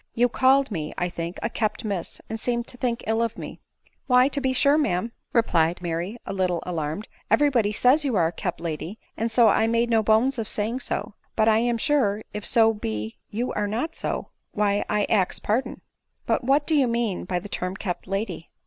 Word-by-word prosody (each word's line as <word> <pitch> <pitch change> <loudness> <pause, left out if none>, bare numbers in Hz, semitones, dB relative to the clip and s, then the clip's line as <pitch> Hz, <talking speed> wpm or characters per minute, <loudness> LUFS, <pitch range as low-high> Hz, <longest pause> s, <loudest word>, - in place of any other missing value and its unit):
You 245 +1 +3
called 265 +1 +3
me, 155 -5 -3
I 180 - 0
think, 170 +1 -5
a 230 - 0
kept 215 +1 -2
miss, 195 -5 -3
and 225 - -5
seemed 235 0 -1
to - - -2
think 240 -2 -1
ill 225 +1 +1
of 230 -2 -1
me." - - -8 0.2
" - - -34
Why, 250 0 +5
to 280 0 -2
be 265 -1 +1
sure, 280 +3 +4
ma'aip," 225 - 0 0.2
replied 175 -7 +2
Mary, 175 +6 -3
a - - -4
little 185 -3 0
alarmed 165 +2 -3
— - - -30
'.' - - -39
every 290 -1 +4
body 225 -5 +2
says 255 +8 +4
you 265 -5 0
are 175 -4 +3
a 165 - 0
kept 175 -1 -4
lady, 165 +4 -5 0.2
and 225 +1 -2
so 230 0 +5
I 220 - +3
made 230 +1 +1
no 225 -1 +4
bones 225 +5 +2
of 220 - -3
saying 220 +4 -1
so; 210 -3 -3 0.2
but 220 0 +3
I 220 0 +5
am 240 0 +1
sure 225 -6 +1
if 210 0 -2
so 225 -2 +5
be 110 - -4
you 235 +4 -2
are 210 0 -1
not 245 +11 -3
so, - - -4 0.2
why 205 -1 +1
I 210 0 +1
ax 195 -4 +2
pardon." 240 +4 -1 0.2
" - - -50
But - - 0
what 275 +3 +3
do 320 - +1
you 280 -4 +4
mean 235 -5 -1
by 180 0 -1
the 175 - -5
term 185 -2 -3
kept 185 -3 -4
lady 195 -3 -3
220 Hz, 230 wpm, -25 LUFS, 185-245 Hz, 0.2 s, Why